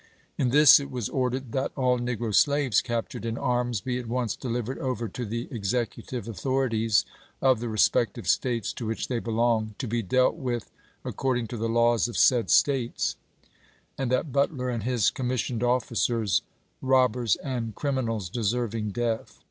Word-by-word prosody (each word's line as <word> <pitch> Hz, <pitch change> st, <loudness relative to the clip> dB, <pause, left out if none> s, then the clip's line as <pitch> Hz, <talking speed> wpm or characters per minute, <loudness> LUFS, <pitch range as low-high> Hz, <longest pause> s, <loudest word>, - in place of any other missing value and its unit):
In 130 Hz, -, +1 dB
this 145 Hz, +2 st, +8 dB
it 140 Hz, -1 st, -6 dB
was 125 Hz, -5 st, -3 dB
ordered 130 Hz, -1 st, -2 dB
"that 135 Hz, +2 st, -1 dB
all 125 Hz, -2 st, +2 dB
negro 120 Hz, -2 st, -2 dB
slaves 140 Hz, -2 st, +3 dB
captured 120 Hz, -3 st, -4 dB
in 115 Hz, 0 st, -3 dB
arms 120 Hz, -3 st, 0 dB
be 125 Hz, -1 st, -2 dB
at 120 Hz, -, -7 dB
once 120 Hz, -2 st, -1 dB
delivered 120 Hz, 0 st, -3 dB
over 120 Hz, -3 st, -2 dB
to 120 Hz, +5 st, -5 dB
the 115 Hz, +3 st, -4 dB
executive 120 Hz, +1 st, -3 dB
authori 130 Hz, +3 st, -1 dB
ties 110 Hz, -3 st, +2 dB, 0.3 s
of 130 Hz, -3 st, +3 dB
the 120 Hz, 0 st, -4 dB
respective 110 Hz, -2 st, +1 dB
States 120 Hz, -5 st, 0 dB
to 115 Hz, -, -5 dB
which 110 Hz, -, -3 dB
they 125 Hz, -2 st, 0 dB
belong, 115 Hz, -2 st, 0 dB
to 130 Hz, -, -4 dB
be 115 Hz, +1 st, -1 dB
dealt 130 Hz, -, +2 dB
with 125 Hz, -6 st, -3 dB, 0.3 s
according 125 Hz, -3 st, -1 dB
to 120 Hz, -, -5 dB
the 115 Hz, +1 st, -2 dB
laws 115 Hz, -1 st, +3 dB
of 120 Hz, -, -6 dB
said 125 Hz, -4 st, +4 dB
States"; 130 Hz, -4 st, +2 dB, 0.8 s
and 135 Hz, -3 st, -2 dB
that 130 Hz, +3 st, 0 dB
Butler 135 Hz, -2 st, 0 dB
and 115 Hz, -2 st, -2 dB
his 120 Hz, -2 st, +1 dB
commissioned 125 Hz, -2 st, -2 dB
officers, 115 Hz, -4 st, +1 dB, 0.4 s
"robbers 125 Hz, -4 st, +3 dB
and 120 Hz, -5 st, -4 dB
criminals 115 Hz, -, -2 dB
deserving 110 Hz, +1 st, -2 dB
death 115 Hz, -1 st, -2 dB
120 Hz, 165 wpm, -26 LUFS, 115-130 Hz, 0.8 s, this